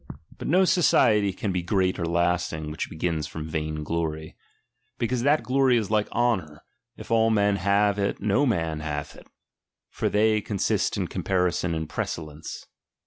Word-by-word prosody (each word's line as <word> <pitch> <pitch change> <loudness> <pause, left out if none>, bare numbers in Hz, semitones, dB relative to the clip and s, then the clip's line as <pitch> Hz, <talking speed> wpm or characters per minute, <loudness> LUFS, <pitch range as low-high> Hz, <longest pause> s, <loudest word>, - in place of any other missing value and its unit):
But - - -5
no 185 +4 +4
society 115 - +4
can 95 +2 -3
be 90 -1 -1
great 95 0 0
or 85 - -1
lasting, 85 -2 0
which 75 - -4
begins 80 -2 -2
from 80 -1 -7
vain 75 -1 -3
glory. 80 -1 -3 0.6
Because 120 0 -1
that 145 +4 +3
glory 130 -1 +3
is 110 -3 -2
like 105 -1 +1
honour; 100 -11 -1 0.3
if - - -10
all 115 0 +4
men 100 -2 +2
have 100 +2 +2
it 100 0 -1
no 105 +8 +2
man 80 -8 -1
hath 75 -2 -5
it, - - -15 0.6
for - - -1
they 110 +1 +2
con 105 -1 -4
sist - - 0
in - - -1
comparison 90 -2 0
and 80 -1 -3
precellence. 75 -1 -5
95 Hz, 165 wpm, -25 LUFS, 80-110 Hz, 0.6 s, no